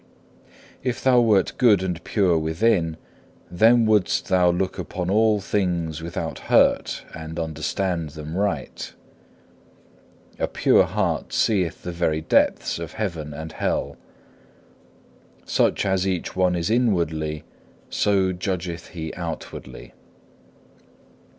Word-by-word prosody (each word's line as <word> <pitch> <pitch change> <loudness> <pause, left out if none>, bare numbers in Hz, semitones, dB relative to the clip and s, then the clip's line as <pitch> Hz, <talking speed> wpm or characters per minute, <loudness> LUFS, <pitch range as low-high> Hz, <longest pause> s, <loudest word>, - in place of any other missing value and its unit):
2. 130 - -1
If 120 - -4
thou 130 -2 +5
wert 105 -5 +3
good 105 -7 +5
and 90 -3 -3
pure 95 -5 +2
within, 80 +1 +1 0.5
then 115 +6 +5
wouldst 105 -4 +2
thou 90 -2 +4
look 95 +2 -1
upon 90 0 -3
all 110 0 +3
things 85 -5 -1
without 85 -1 -4
hurt - - +3
and 80 0 -7
understand 80 +1 -2
them 75 +2 -7
aright. 95 -8 -2 1.5
A - - +1
pure - - +3
heart - - -1
seeth 95 -6 +1
the 90 - -4
very 85 -2 0
depths - - +1
of - - -6
heaven 85 -8 -4
and 80 +2 -7
hell. - - -2 1.5
Such - - +1
as 95 -1 +1
each 90 -3 -2
one 90 -1 +2
is 85 +3 -1
inwardly, 80 -10 0 0.5
so 95 -2 +2
judgeth 90 -1 -4
he 80 -3 -6
outwardly. 80 -7 -7
90 Hz, 120 wpm, -23 LUFS, 80-100 Hz, 1.5 s, thou